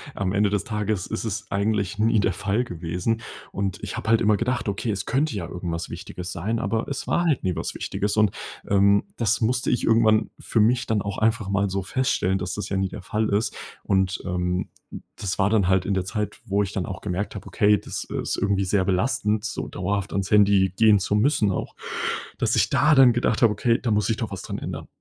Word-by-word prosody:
Am 95 -1 -1
Ende 105 0 +3
des 100 -1 0
Tages 105 -3 -2
ist 110 - -4
es 100 -2 -4
eigentlich 100 0 0
nie 110 +1 +3
der 100 - +1
Fall 100 +5 0
gewesen. 90 +3 -3 0.3
Und 95 -2 -2
ich - - -4
habe - - -4
halt 115 - +5
immer 105 -2 +3
gedacht: 120 +1 -1
„Okay, 100 +3 -2
es 100 -2 -2
könnte 135 -1 0
ja 90 -4 -4
irgendwas 85 -1 -5
Wichtiges 90 0 -7
sein“, 110 +8 -2
aber 110 +2 -1
es 140 - -4
war 175 - +1
halt 155 -6 +1
nie 90 -2 0
was - - -4
Wichtiges 105 +1 -2
und, 105 -3 +4 0.4
ähm, 100 0 +4
das 115 0 +1
musste 120 +2 +1
ich 120 - +1
irgendwann 110 -1 +3
für 115 - -1
mich 120 +3 +3
dann 110 -3 0
auch 100 -1 -4
einfach 110 -2 +1
mal 100 0 +1
so 95 0 -2
feststellen, 95 -5 0
dass 90 0 -3
das 105 - -5
ja 95 - -1
nie 95 0 0
der 95 - -8
Fall 105 +2 -1
ist. 105 +3 0 0.3
Und, 95 -1 +1
ähm, 90 0 -1 0.5
das 95 -2 -3
war 95 0 +3
dann 105 -4 +2
halt 95 -1 +2
in 100 - 0
der 95 - -1
Zeit, 105 +1 -3
wo 100 -1 +1
ich 95 - -4
dann 95 - -2
auch 95 - -6
gemerkt 100 +2 -3
habe: 100 - -7
„Okay, 105 0 +3
das 105 - -6
ist - - -3
irgendwie 100 -1 +1
sehr 95 0 +1
belastend, 105 +2 0
so 110 - -3
dauerhaft 100 +2 -3
ans 100 0 -2
Handy 100 -3 +4
gehen 110 -1 +6
zu 95 +1 -1
müssen“, 105 -2 +3
auch, - - -4 0.6
dass - - +1
ich - - +3
da 155 -1 +4
dann 130 -3 +7
gedacht 120 +1 +1
habe: 110 - +5
„Okay, 120 0 +2
da 120 - -1
muss 105 0 +1
ich 110 - +1
doch 110 - -4
was 100 - -5
dran - - -5
ändern.“ - - -6
100 Hz, 230 wpm, -24 LUFS, 95-110 Hz, 0.6 s, dann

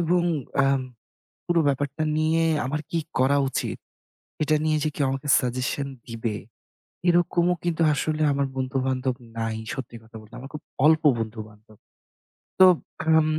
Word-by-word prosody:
এবং 175 +1 +2 0.4
আম 135 -1 +2 0.7
পুরো 170 -1 +2
ব্যাপারটা 140 +2 -1
নিয়ে 160 +1 +2 0.2
আমার 150 +3 -2
কি 165 - +1 0.2
করা 140 +2 +4
উচিত? - - -3 0.7
এটা 155 +1 +2
নিয়ে 155 -1 +2
যে 155 - +1
কেউ 140 - +1
আমাকে 135 +2 -4
সাজেশন 130 +2 -2 0.2
দিবে, 115 -2 -3 0.7
এরকমও 175 0 +3
কিন্তু 170 -1 -1
আসলে 155 +2 -1
আমার 140 0 0
বন্ধুবান্ধব 130 -1 -1 0.2
নাই 115 -1 -2 0.2
সত্যি 125 -3 -6
কথা 110 - -18
বলতে। 110 +1 -18
আমার 135 +2 -9
খুব 150 - -7 0.2
অল্প 160 0 +5 0.2
বন্ধুবান্ধব। 110 -1 -8 0.8
তো 185 - +10 0.4
এখন 160 0 +4
140 Hz, 140 wpm, -25 LUFS, 125-160 Hz, 0.8 s, তো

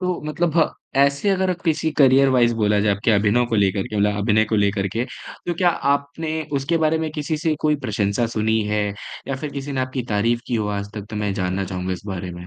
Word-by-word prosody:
तो 180 -1 -1
मतलब 160 +1 -1
हाँ 160 - +5 0.3
ऐसे 140 +7 +3
अगर 190 -1 +1
अब 180 0 -3
किसी 160 -1 +1
करियर 135 0 +6
वाइज़ 120 -2 +3
बोला 105 -2 +2
जाए 105 -1 +3
आपके 105 +3 0
अभिनव 110 +4 +3
को 115 - -2
लेकर 100 -1 +1
के 105 - -5
मतलब 105 0 +2
अभिनय 110 +1 +3
को 110 0 -1
लेकर 100 -1 +1
के, 115 +6 -2 0.4
तो 175 - -1
क्या 175 0 +3
आपने 150 +2 -1 0.2
उसके 150 +5 0
बारे 160 +1 +2
में 160 -1 -2
किसी 155 0 -2
से 155 0 0
कोई 150 -1 +2
प्रशंसा 105 +2 0
सुनी 110 0 0
है? 105 0 +1 0.4
या 135 - -1
फ़िर 145 +2 -5
किसी 140 0 -5
ने 130 - -1
आपकी 130 0 -2
तारीफ़ 115 +3 +1
की 120 - -2
हो 105 -2 0
आज 100 +1 -6
तक 105 -1 -6
तो 105 - -5
मैं 105 -1 -1
जानना 95 0 -1
चाहूँगा 90 0 -3
इस 90 - -6
बारे 95 -2 -4
में? 90 0 -9
115 Hz, 240 wpm, -22 LUFS, 105-150 Hz, 0.4 s, करियर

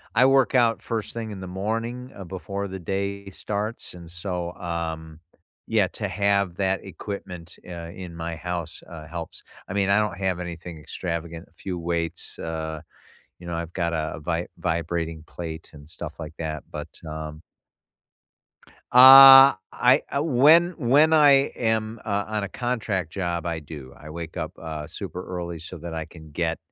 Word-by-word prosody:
I 125 +2 +6
work 135 0 +4
out 115 -2 +3
first 115 -3 -3
thing 115 -2 -4
in 95 -2 -7
the 95 - -6
morning, 115 +6 -3
uh, 95 - -8
before 100 +2 -5
the 95 0 -6
day 100 +2 -3
starts, 105 +3 -4
and 85 -2 -11
so, 90 -1 -4
um, 80 -2 -5 0.5
yeah, 105 -4 +3
to 105 0 -4
have 100 -1 +1
that 95 0 0
equipment, 90 -2 -7
uh, 85 -1 -7
in 90 -3 -8
my 85 0 -4
house, 85 0 -5
uh, 80 -2 -9
helps. 85 0 -7 0.3
I - - -4
mean, 100 -1 +1
I 100 +2 +5
don't 105 -5 -1
have 95 -2 -1
anything 85 -2 -7
extravagant, 85 +1 -5
a - - -33
few 90 +2 -5
weights, 85 0 -3
uh, 80 -1 -4 0.6
you 90 - -12
know, 85 - -4
I've 85 0 -5
got 85 -2 -1
a 80 -1 -2
vi 85 +2 -2
vibrating 85 -2 -2
plate 80 -2 -7
and 75 0 -13
stuff 80 - -7
like 80 -1 -7
that, 75 -2 -4
but, - - -5 0.2
um 75 0 -6 1.5
Uh, 135 +1 +11 0.2
I 125 +1 +4
uh 140 - +2
when 160 +5 +6
when 145 +6 +4
I 145 -3 +6
am, 110 -1 0
uh, 100 -1 0
on 105 -1 -2
a 100 - -4
contract 110 - -2
job, 85 -3 -2
I 85 -2 -2
do. 70 -3 -10
I 75 - -11
wake 85 +2 -7
up, 80 +2 -5
uh, 80 -2 -6
super 90 +1 -7
early 85 -2 -5
so 85 +2 -8
that 85 0 -7
I 80 0 -3
can 80 -2 -14
get 85 +1 -1
90 Hz, 175 wpm, -25 LUFS, 80-105 Hz, 1.5 s, Uh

